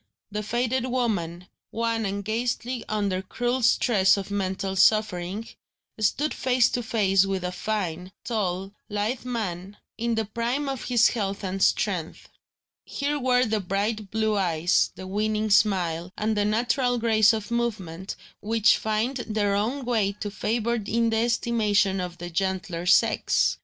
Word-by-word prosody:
The 210 +1 -2
faded 245 +4 -1
woman, 190 -9 -2 0.2
wan 230 -1 -1
and 200 0 -4
ghastly 240 +2 -2
under 200 -3 0
cruel 245 +6 -2
stress 205 -5 +4
of 200 0 -5
mental 190 -1 -2
suffering, 205 0 +2 0.5
stood 275 +8 +1
face 255 -1 +2
to 245 - -1
face 195 -4 +2
with 190 -2 -2
a 180 - -2
fine, 180 -3 -3
tall, 195 -4 -2 0.2
lithe 210 +5 -2
man, 205 -5 -4 0.2
in 235 0 0
the 220 0 0
prime 235 +7 -2
of 270 -2 -4
his 245 -2 +4
health 200 -3 -3
and 190 0 -3
strength. 185 -5 0 0.5
Here 290 +1 -2
were 250 -1 +3
the 220 -1 0
bright 205 +2 -2
blue 220 0 0
eyes, 175 -3 +2
the 185 - -8
winning 215 +2 -1
smile, 180 -4 +2
and 215 +1 0
the 205 0 +1
natural 245 +3 +1
grace 220 -2 +4
of 220 0 -4
movement, 200 -7 -3 0.2
which 220 0 +3
find 220 +5 -1
their 215 -4 -1
own 240 +7 -1
way 220 -5 +1
to 205 0 -6
favour 235 +3 -1
in 230 +2 +1
the 225 - +1
estimation 215 -4 +1
of 175 -1 -5
the 175 0 -7
gentler 185 -1 -2
sex. - - +3
215 Hz, 150 wpm, -25 LUFS, 195-235 Hz, 0.5 s, stress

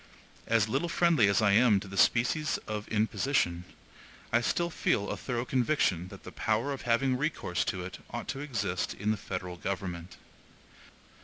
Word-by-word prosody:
As 115 -2 +3
little 135 +9 -1
friendly 165 -11 +4
as 100 +2 +3
I 100 - +5
am 110 -1 +5
to 100 - -9
the 95 - -8
species 125 +10 +2
of 105 -1 -4
imposition, 105 -5 0 0.7
I 120 - +4
still 170 +7 0
feel 100 -9 0
a - - -2
thorough 120 -1 -3
conviction 125 - +1
that - - -12
the - - -9
power 115 +6 0
of 135 - -6
having 130 +3 +3
recourse 135 - -1
to 90 -2 -2
it 95 - -8
ought 120 - -5
to 135 +1 -3
exist 105 -11 -2
in 105 +2 -1
the - - +1
federal 90 -2 -5
government. 90 -2 -5
110 Hz, 170 wpm, -30 LUFS, 95-130 Hz, 0.7 s, I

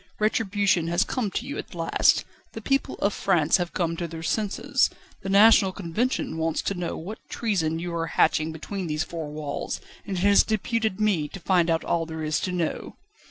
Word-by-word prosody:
Retribution 205 -5 +1
has 170 +1 +2
come 245 -6 -2
to 225 +6 -3
you 280 - -5
at - - -8
last; 165 -1 +2 0.3
the 225 - -7
people 275 +5 0
of 200 - 0
France 170 -4 +2
have 175 -2 -3
come 170 -2 -1
to 170 - -3
their 165 0 -8
senses. 205 +3 +1 0.3
The 195 - -5
National 200 -1 +6
Convention 185 0 -2
wants 160 0 0
to - - -1
know 175 -2 -4
what 200 +7 -7
treason 170 -9 0
you 175 +1 -4
are 165 0 -1
hatching 155 0 +2
between 180 +4 -5
these 155 0 -1
four 165 -4 -6
walls, 150 -1 -4 0.3
and 195 -2 -3
it - - -2
has 200 0 +6
deputed 220 -1 -1
me 195 -8 +1
to 195 - -9
find 175 -1 +2
out 165 0 +1
all 165 -1 0
there 160 -1 -5
is 155 +1 0
to 185 - -2
know." 175 -3 -3
175 Hz, 200 wpm, -25 LUFS, 165-205 Hz, 0.3 s, National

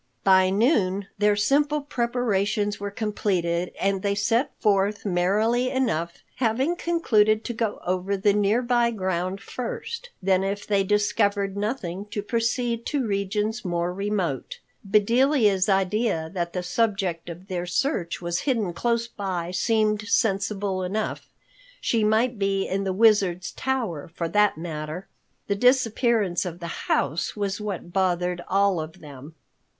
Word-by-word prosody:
By 190 -1 +5
noon 200 - +1
their 210 0 +4
simple 290 +8 +2
preparations 230 -6 -1
were 200 0 -3
completed 185 -5 -1
and 195 -1 0
they 200 0 0
set 230 +6 +1
forth 205 0 +1
merrily 210 +7 +2
enough, 195 -11 -1
having 260 +7 +1
concluded 220 -12 +2
to 240 - -4
go 225 -2 -2
over 185 +2 -1
the 200 +1 +3
nearby 235 +4 +2
ground 185 -2 -2
first, 465 - -6
then 190 -1 +2
if 200 +1 -3
they 200 -2 +2
discovered 205 0 +1
nothing 200 -3 -3
to 205 -1 -4
proceed 235 +1 -1
to 285 -4 0
regions 210 +3 -1
more 175 -1 -1
remote. 190 - -2 0.3
Bedelia's 215 -1 +3
idea 190 -4 +1
that 170 -2 -3
the 180 - -2
subject 190 -4 -1
of 175 +3 -9
their 180 -2 -3
search 180 - -1
was 170 0 -1
hidden 215 -9 0
close 235 +4 0
by 185 -6 -4
seemed 215 +2 +1
sensible 195 -3 0
enough. 200 +4 -3 0.5
She 225 -2 +1
might 220 +2 +2
be 195 -1 0
in 195 +1 -1
the 190 - 0
Wizard's 190 -4 +3
tower 230 - -3
for 170 - -2
that 210 -3 +3
matter. 160 +1 -5 0.4
The 200 - 0
disappearance 230 -4 +2
of 175 -2 -6
the 170 -1 -7
house 145 +5 0
was 205 0 -2
what 190 -4 -5
bothered 180 -2 0
all 195 -2 +3
of 160 +3 -7
them. 145 +1 -11
200 Hz, 140 wpm, -25 LUFS, 185-225 Hz, 0.5 s, By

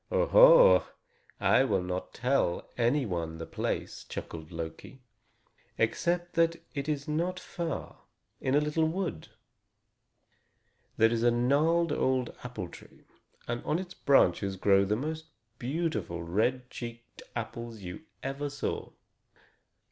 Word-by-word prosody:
"Oho! - - +7 0.6
I 130 - +4
will 100 -8 +1
not 90 0 -4
tell 125 -8 0
any 125 +4 +2
one 85 -5 -3
the 80 - -6
place," - - -3
chuckled 80 0 -7
Loki, 85 +10 -7 0.7
"except 175 +9 0
that 165 0 +3 0.2
it 140 0 -3
is 145 -2 -2
not 170 +4 -1
far, 170 -3 -5 0.4
in 130 0 0
a - - +6
little 150 +2 +1
wood. 170 - -3 1.7
There 115 +1 +5
is 115 -1 0
a 120 - +5
gnarled 145 +8 +2
old 130 -3 0
apple 120 -7 -5
tree, - - -15 0.4
and 120 0 -3
on 155 - 0
its 185 0 -6
branches 100 -7 +3
grow 100 +1 +4
the 105 +2 +1
most 155 +6 -4 0.3
beautiful 120 - -2
red 120 +9 0
cheeked 120 -1 -8
apples 115 -1 -5
you 90 - -7 0.2
ever 135 +2 -3
saw. 140 - -3
125 Hz, 125 wpm, -30 LUFS, 105-155 Hz, 1.7 s, Oho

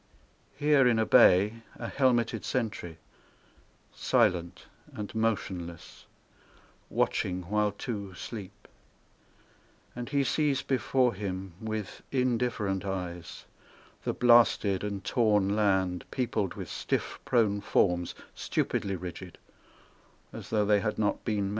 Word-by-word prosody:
Here 145 -3 +4
in 120 -2 +3
a 110 - +2
bay, 105 +5 +5
a 115 - -6
helmeted 120 -4 +1
sentry 110 -9 -3 1.0
Silent 95 -9 +1 0.3
and 105 -1 -6
motionless, 95 -7 -3 0.8
watching 90 0 0
while 105 -1 +2
two 100 -3 -6
sleep, 105 0 -8 1.3
And 120 +1 -5
he 140 -1 +2
sees 140 -1 +1
before 130 -2 +1
him 95 -2 -5
With 110 -3 -5
indifferent 120 -7 0
eyes 90 -3 -5 0.6
the - - 0
blasted 115 -5 +4
and 100 -2 -4
torn 105 -5 +2
land 95 -4 +1
Peopled 115 -7 -1
with - - -6
stiff - - -2
prone 105 -4 +2
forms, 90 -3 +1 0.2
stupidly 100 -1 -1
rigid, 90 0 -8 1.0
As - - -8
tho' 105 -2 +2
they 105 0 +4
had 105 +1 -2
not 105 -1 0
been 105 -3 0
men. 100 - -1
105 Hz, 115 wpm, -29 LUFS, 95-120 Hz, 1.3 s, bay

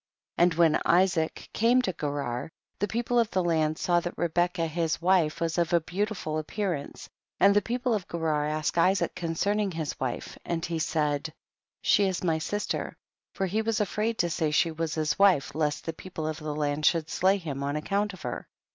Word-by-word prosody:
4. - - +6
And 175 -1 +4
when 165 -2 +4
Isaac 175 -2 +2
came 235 +3 +4
to 185 - -1
Gerar, 145 -5 -3 0.3
the 205 - +1
people 240 +3 0
of 230 -2 +2
the 185 - 0
land 155 -2 +1
saw 175 -1 +2
that 175 +1 -5
Re 170 - 0
becca 175 +1 +1
his 165 0 -1
wife 175 -3 +2
was 165 +1 0
of 170 0 0
a 170 - +6
beautiful 180 -2 -2
ap 155 - -7
pearance, 180 -9 -3 0.3
and 200 +1 +6
the 205 - +5
people 245 +3 -1
of 205 -4 -2
Gerar 155 -3 0
asked 155 +2 -1
Isaac 185 +3 +2
concerning 195 +4 0
his 160 -4 -4
wife, 130 -2 -4
and 170 -1 -2
he 165 -1 -2
said, 150 -1 0 0.5
she 205 - +4
is 185 -2 -2
my 165 -3 +1
sister, 205 +6 -3 0.4
for 195 - 0
he 205 +4 0
was 220 -1 0
afraid 215 +2 -1
to 175 - +1
say 160 -2 0
she 155 +2 +2
loos 160 0 -3
his 155 +1 -1
wife 185 -8 +4
lest 150 -1 -1
the 165 - -3
people 160 -2 -7
of 155 -1 -3
the 155 -1 -4
land 150 0 -1
should 165 -3 +2
slay 190 +4 +2
him 150 -7 -5
on 140 +1 -1
account 200 +7 0
of 190 - -12
her. - - -5
170 Hz, 205 wpm, -28 LUFS, 155-195 Hz, 0.5 s, 4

